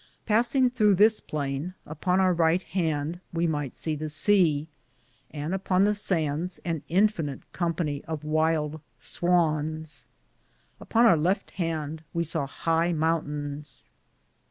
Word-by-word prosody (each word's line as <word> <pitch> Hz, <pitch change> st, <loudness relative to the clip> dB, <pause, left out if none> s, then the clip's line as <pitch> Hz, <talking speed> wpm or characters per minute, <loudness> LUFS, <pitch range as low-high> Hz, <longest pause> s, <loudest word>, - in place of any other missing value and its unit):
Pasinge 245 Hz, +3 st, +3 dB
throughe 210 Hz, -6 st, +4 dB
this 215 Hz, +2 st, +5 dB
plaine, 145 Hz, +4 st, -4 dB
upon 180 Hz, +5 st, 0 dB
our 185 Hz, -1 st, +4 dB
righte 170 Hz, +2 st, +2 dB
hande 160 Hz, -2 st, -2 dB
we 170 Hz, 0 st, 0 dB
myghte 145 Hz, -5 st, -2 dB
se 160 Hz, -2 st, -2 dB
the 155 Hz, +1 st, -5 dB
seae, 155 Hz, -2 st, +3 dB, 0.6 s
and 150 Hz, +3 st, -4 dB
upon 190 Hz, 0 st, +1 dB
the 210 Hz, +1 st, +3 dB
sandes 175 Hz, -3 st, 0 dB
an 165 Hz, -3 st, -2 dB
infinite 175 Hz, -7 st, +1 dB
com 170 Hz, -2 st, -1 dB
pany 145 Hz, -5 st, -2 dB
of 160 Hz, -2 st, -5 dB
wyld 155 Hz, 0 st, 0 dB, 0.2 s
swans.^ 160 Hz, -3 st, 0 dB, 0.7 s
Upon 235 Hz, +1 st, +2 dB
our 175 Hz, -8 st, +6 dB
lefte 180 Hz, +6 st, 0 dB
hande 160 Hz, -3 st, -3 dB
we 170 Hz, -, +1 dB
sawe 160 Hz, -3 st, -2 dB
highe 165 Hz, +4 st, 0 dB
mountains. 150 Hz, -2 st, -2 dB
165 Hz, 130 wpm, -27 LUFS, 150-185 Hz, 0.7 s, our